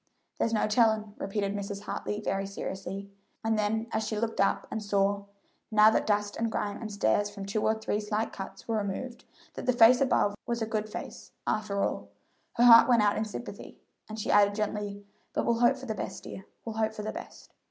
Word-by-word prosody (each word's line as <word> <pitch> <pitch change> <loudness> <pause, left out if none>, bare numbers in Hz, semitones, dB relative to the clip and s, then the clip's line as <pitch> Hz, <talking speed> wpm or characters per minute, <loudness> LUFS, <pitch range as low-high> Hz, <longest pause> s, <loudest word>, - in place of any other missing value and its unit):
"There's 230 - +1
no 220 - +2
tellin'," 215 -1 +2
repeated 200 0 -2
Mrs. 200 0 -4
Hartley 210 0 -4
very 195 -1 -1
seriously; 195 0 -6 0.3
and 225 0 +1
then 215 +1 0
as 220 - 0
she 215 - -3
looked 225 -2 -1
up 195 - +1
and 220 - -3
saw, 200 -1 +1 0.4
now 215 -1 +6
that - - 0
dust 205 -1 +1
and 230 0 -1
grime 205 -2 -2
and 225 - -6
the - - -8
stains 200 - +2
from 200 -1 -8
two 205 +2 -1
or 220 - +2
three 220 -1 -2
slight 215 +1 -2
cuts 195 0 -8
were 225 -1 0
removed, 215 +5 -4 0.3
that - - -7
the 250 - +4
face 240 +2 +7
above 250 -6 +3
was 235 -1 -1
a 225 - 0
good 215 -1 -2
face, - - -8
after 205 -2 0
all, - - -2 0.4
her 240 - +2
heart 235 0 +9
went 235 -3 +5
out 205 0 +3
in 215 - -1
sympathy, 220 +3 -8 0.3
and 215 +1 -6
she - - -1
added 205 0 +5
gently, 205 -1 -3 0.3
"but - - 0
we'll 235 -1 +1
hope 245 +3 +4
for 265 - -9
the 225 - -2
best, 215 - -6
dear 190 - -9 0.2
we'll 225 -1 -5
hope 220 0 0
for 210 - -5
the 215 - -3
best. - - -10
215 Hz, 215 wpm, -29 LUFS, 205-225 Hz, 0.4 s, heart